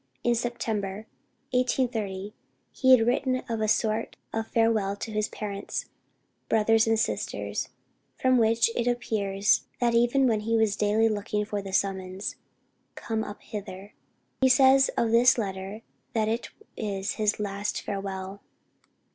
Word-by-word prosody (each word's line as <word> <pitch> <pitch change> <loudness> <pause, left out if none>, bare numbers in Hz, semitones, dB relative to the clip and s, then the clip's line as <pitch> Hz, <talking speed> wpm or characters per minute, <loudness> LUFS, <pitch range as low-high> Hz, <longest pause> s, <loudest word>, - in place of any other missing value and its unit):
In 240 - +3
September, 220 -4 -3 0.5
1830, 225 -6 -1 0.4
he 260 -1 +6
had 225 - +1
written 255 +2 +1
a 220 -2 -1
sort 215 +1 0 0.2
of 225 0 -2
farewell 220 -4 +1
to 220 +2 -6
his 215 0 -1
parents, 200 -2 -5 0.6
brothers 225 0 +3
and 225 0 +3
sisters, - - -2 0.5
from 255 -1 +3
which 230 +1 +3
it 240 - 0
appears 205 -5 +1
that 240 -1 +2
even 240 +3 +3
then 225 -4 +2
he 225 +2 0
was 220 -2 +2
daily 215 +1 +2
looking 210 -1 -1
for 205 -1 -3
the 195 -1 -7
summons 190 0 -2 0.6
"Come 220 -1 -3
up 205 - -9
hither." 200 -1 -8 0.5
He 260 - +5
says 265 +1 +6
of 230 -1 +2
this 240 +2 +5
letter 195 0 -4 0.3
that 220 -2 +1
it 230 +2 -2 0.3
is 200 -2 -3
his 215 0 +1
last 205 0 -3
farewell. 195 0 -5
220 Hz, 140 wpm, -27 LUFS, 200-235 Hz, 0.6 s, he